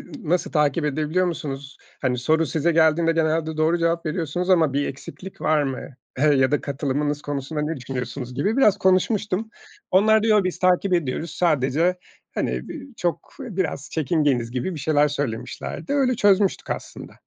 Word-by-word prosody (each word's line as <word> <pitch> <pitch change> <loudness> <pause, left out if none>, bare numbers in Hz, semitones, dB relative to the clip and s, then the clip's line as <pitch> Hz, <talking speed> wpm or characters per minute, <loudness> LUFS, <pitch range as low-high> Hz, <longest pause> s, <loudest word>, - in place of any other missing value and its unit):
n - - -11 0.3
nasıl 180 - 0
takip 150 0 +2
edebiliyor 155 +5 0
musunuz? 140 -4 -5 0.2
Hani, 125 -2 0
soru 160 +6 +2
size 160 +5 +1
geldiğinde 165 +1 +3
genelde 160 -1 0
doğru 160 +2 +2
cevap 165 0 0
veriyorsunuz 175 +2 -2
ama 160 -6 +4
bir 140 +1 0
eksiklik 145 +7 -9
var 155 -1 +2
mı, 135 -2 -3 0.4
eee, 145 - +2
ya 130 -1 +3
da 145 - +1
katılımınız 145 +1 -2
konusunda 145 +1 -3
ne 155 +2 -2
düşünüyorsunuz 125 0 -5
gibi 205 - 0
biraz 210 -7 +4
konuşmuştum. 200 +2 +1 0.4
Onlar 215 +3 +4
diyor, 215 -3 +4
biz 185 - -2
takip 185 +1 +2
ediyoruz 160 0 -1
sadece 160 +2 +1 0.4
hani - - -2
bi 285 -4 -7
çok 175 -1 -2
biraz 185 - -3
çekingeniz 145 -7 +1
gibi 130 +9 -3
bir 150 - -6
şeyler 150 0 +3
söylemişlerdi. 135 - -4
Öyle 265 -3 +2
çözmüştük 200 -2 +2
aslında. - - -6
160 Hz, 160 wpm, -23 LUFS, 140-180 Hz, 0.4 s, ama